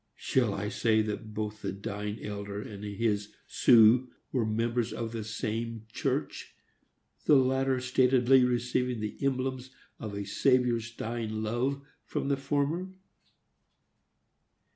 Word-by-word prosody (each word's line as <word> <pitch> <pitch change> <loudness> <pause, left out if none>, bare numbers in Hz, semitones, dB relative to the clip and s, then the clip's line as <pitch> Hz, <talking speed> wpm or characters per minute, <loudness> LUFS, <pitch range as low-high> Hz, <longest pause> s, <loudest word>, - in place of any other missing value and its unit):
Shall 120 -6 +1
I 100 +1 -3
say 110 0 +2
that 110 +1 -5
both 105 0 -4
the 100 - -2
dying 105 +2 -5
elder 100 -1 -5
and 105 -1 -8
his 105 0 -2
"Su" 120 +1 +5 0.2
were 120 -5 0
members 115 +1 0
of 115 0 -4
the 115 -2 -4
same 110 +1 -4
church, - - -3 0.7
the 150 - +6
latter 130 0 +2
statedly 125 0 +4
receiving 125 0 0
the 105 0 -4
emblems 130 -1 -1 0.3
of 105 -3 -6
a 100 0 -4
Saviour's 120 +1 +2
dying 110 -1 -4
love 130 +6 -1 0.2
from - - -3
the 140 - +2
former! 150 +7 -1
115 Hz, 125 wpm, -29 LUFS, 105-130 Hz, 0.7 s, the